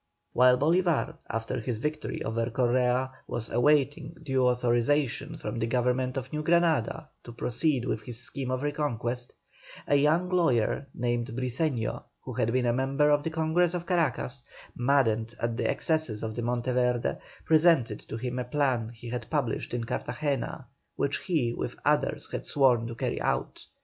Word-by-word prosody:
While 125 0 +6
Bolívar, 165 +1 +2
after 115 +3 -2
his 115 0 -3
victory 150 +7 -3
over 115 +1 -1
Correa, 125 +1 +1 0.2
was 120 -1 -4
awaiting 145 +4 +2
due 135 -3 +2
authorization 125 +5 +1
from 120 - -4
the 115 - 0
Government 125 +2 0
of 130 +1 -5
New 150 - -1
Granada 165 -1 +2
to 120 - -9
proceed 125 +3 0
with 110 -3 -1
his 115 +1 -7
scheme 135 0 -4
of 130 +1 -1
reconquest, 125 -5 -2 0.5
a 145 - +2
young 155 +5 +3
lawyer 140 -7 +2
named 120 -1 -1
Briceño, 125 0 -2 0.2
who - - -7
had 115 - 0
been 125 0 +1
a 120 - +3
member 135 +4 +2
of 145 0 +4
the 160 - -2
Congress 160 +2 +1
of 175 -1 -3
Caracas, 140 -7 0 0.3
maddened 120 -3 +2
at 115 -1 -1
the 125 - 0
excesses 155 -10 0
of 110 -1 -3
Monteverde, 125 +1 0 0.3
presented 155 -9 +4
to 110 - -7
him 125 +1 -3
a - - -1
plan 125 -3 0
he 120 0 -11
had 120 -1 -5
published 140 -8 -1
in 120 -1 -2
Cartagena, 130 +2 -3 0.3
which 140 - 0
he 140 -10 0
with - - -4
others - - +1
had - - -5
sworn 125 -5 +3
to 115 - -6
carry - - -2
out. - - -2
130 Hz, 160 wpm, -28 LUFS, 120-150 Hz, 0.5 s, While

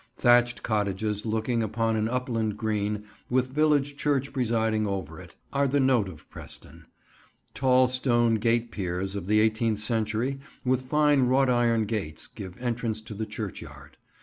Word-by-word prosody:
Thatched 120 -1 +4
cottages 105 0 -1
looking 110 +2 0
upon 115 +1 0
an 110 0 0
upland 115 -4 -1
green, 105 -1 -1 0.3
with 130 +1 +1
village 145 -1 +2
church 140 -2 0
presiding 110 -4 +1
over 90 -4 -4
it, 90 -1 -14 0.2
are 140 0 +2
the 140 +2 +1
note 130 -7 +3
of 80 -4 -13
Preston. 80 +3 -10 0.7
Tall 130 -1 +4
stone 120 -2 +2
gate 115 +1 +1
piers 95 0 -3
of 95 -3 -5
the 105 +1 +4
eighteenth 110 0 +2
century, 110 +4 -1 0.3
with 130 0 +2
fine 145 0 +3
wrought 130 +1 +3
iron 115 -2 +2
gates, 100 -8 -4
give 95 -1 -9
entrance 120 -3 -2
to 110 - -7
the 110 +1 -4
churchyard. - - -8
115 Hz, 150 wpm, -27 LUFS, 105-125 Hz, 0.7 s, Thatched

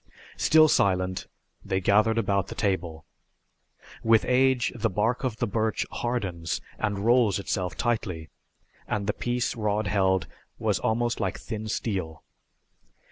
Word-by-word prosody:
Still 155 0 +6
silent, 95 -8 +1 0.4
they 95 -1 -1
gathered 105 +4 +3
about 100 -4 +1
the - - -7
table. 85 -6 -2 1.0
With 115 -1 +4
age 130 -1 +3
the 115 - 0
bark 110 +7 0
of 125 -4 -2
the - - 0
birch 110 +1 -1
hardens 95 -10 -2 0.2
and 100 -2 -1
rolls 120 -4 +4
itself 95 -2 -3
tightly, 95 -10 -2 0.6
and 105 -1 -2
the 105 - 0
piece 120 +1 -1
Rod 105 -1 0
held 95 -3 +2 0.3
was - - 0
almost 120 +1 0
like - - -1
thin 110 -2 -5
steel. 95 -8 -3
105 Hz, 135 wpm, -26 LUFS, 95-115 Hz, 1.0 s, Still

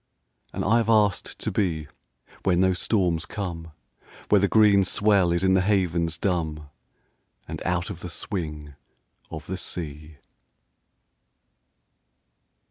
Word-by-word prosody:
And - - -3
I 110 +4 +4
have 115 -1 0
asked 105 -3 +2
to - - -3
be 80 -7 -1 0.5
Where 95 - +2
no 95 +1 +3
storms 90 -3 0
come, 85 -5 -5 0.6
Where 105 -2 +5
the 100 - +3
green 105 -2 +5
swell 100 -2 +2
is 85 +1 0
in 95 0 +4
the 95 - +4
havens 90 -5 +1
dumb, 80 -5 -2 0.8
And - - -6
out 90 +2 -1
of 90 - -7
the 90 - -7
swing 75 -5 -5 0.6
of 80 -2 -7
the 95 - -4
sea. 75 -4 -6
90 Hz, 130 wpm, -25 LUFS, 80-100 Hz, 0.8 s, Where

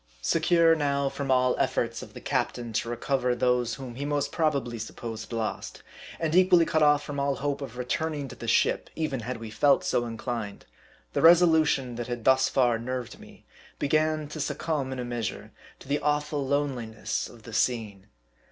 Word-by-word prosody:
Secure 165 - +4
now 140 -3 0
from 140 0 -5
all 125 -1 +3
efforts - - 0
of - - -11
the - - -8
captain 120 -2 -2
to 115 - -1
recover 125 +1 0
those 125 -2 +1
whom 130 -1 -8
he 135 +4 -5
most 145 0 -1
probably 140 -7 0
supposed 110 +1 -7
lost; 115 -2 -4 0.4
and 160 -1 -1
equally 180 -2 +6
cut 160 -1 +1
off 150 -1 +4
from 145 -1 -5
all 140 0 +1
hope 145 +1 -2
.of 125 -3 -7
returning 145 +3 -2
to - - -10
the - - -8
ship - - +2
even 155 -5 -2
had 125 +2 -4
we 115 -1 -8
felt 140 +6 +3
so 120 - 0
inclined; 115 -2 -5 0.5
the - - 0
resolution 160 -7 +5
that 120 - -4
had 120 -2 -4
thus 130 +1 +4
far 120 -3 +2
nerved 125 0 -5
me, - - -16 0.3
began 155 +1 +1
to 150 +1 -8
succumb 150 -2 -2
in 130 - -4
a 125 - -3
measure 120 -4 -4 0.3
to - - -15
the 145 +2 0
awful 150 -1 -1
loneli 140 -4 -1
ness - - -3
of 115 -2 -15
the 115 - -10
scene. 105 -5 -1
135 Hz, 185 wpm, -27 LUFS, 120-150 Hz, 0.5 s, equally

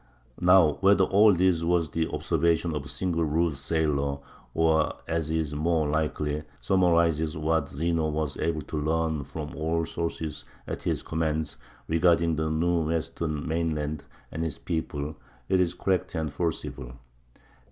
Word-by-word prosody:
Now, 90 -4 +5
whether 100 0 +5
all 105 +3 +6
this 90 -2 +3
was 85 -2 +1
the 80 0 0
observation 85 +1 +1
of 75 -2 -3
a - - -8
single 85 -3 -1
rude 80 +1 +1
sailor, 70 -1 0 0.4
or, 80 -1 +2
as 80 -2 -1
is 80 -2 -1
more 80 +1 +1
likely, 75 0 -1 0.2
summarizes 85 -4 +2
what 80 -1 0
Zeno 80 +1 0
was 75 -2 -2
able 80 -2 -1
to 75 +2 -4
learn 80 -1 0
from 75 +1 -7
all 80 +1 0
sources 80 -2 -4 0.2
at - - -5
his - - -1
command 80 -1 -2 0.3
regarding 85 0 +3
the 80 0 -1
new 85 +1 +1
western 80 -1 -2
mainland 80 -2 -2 0.3
and 80 - -3
its 80 -4 -3
people, 75 -3 -3 0.3
it 95 -1 +3
is 90 -1 +1
correct 95 -1 -1
and 80 -3 -2
forcible. 75 -6 -3
80 Hz, 145 wpm, -27 LUFS, 75-85 Hz, 0.4 s, all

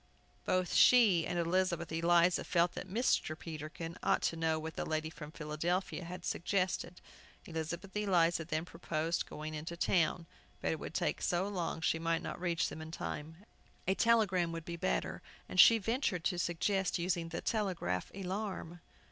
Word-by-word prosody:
Both 185 -1 +1
she 210 -10 +6
and 175 - -2
Elizabeth 170 0 0
Eliza 170 +2 +3
felt 175 -1 +2
that - - -7
Mr. 200 -7 +1
Peterkin 160 +1 -7
ought - - +2
to - - +1
know 160 -1 +1
what 160 +1 -5
the - - -2
lady 155 0 -2
from 150 -2 -9
Philadelphia 165 +5 -2
had 180 +1 -7
suggested. 180 -1 -1 0.5
Elizabeth 170 +4 -5
Eliza 175 -5 +2
then 155 0 -2
proposed 165 -1 -2
going 155 +1 -6
into 160 +3 -5
town, 170 -1 +1 0.3
but - - 0
it - - -2
would - - -7
take - - 0
so 180 +2 +1
long 175 -5 -3
she 160 - +1
might 165 0 0
not - - -5
reach 170 -2 +1
them 160 - -7
in 160 - -7
time. 160 +3 -6 0.4
A 190 - +4
telegram 195 -6 +3
would 165 -1 -6
be 170 - -4
better, 60 - -1 0.3
and 185 - -3
she 230 +5 +9
ventured 225 - -1
to 180 -1 0
suggest 190 +3 0
using 170 -1 -1
the 165 - -4
Telegraph 185 - -1
Alarm. 190 -3 -4
170 Hz, 165 wpm, -34 LUFS, 160-185 Hz, 0.5 s, she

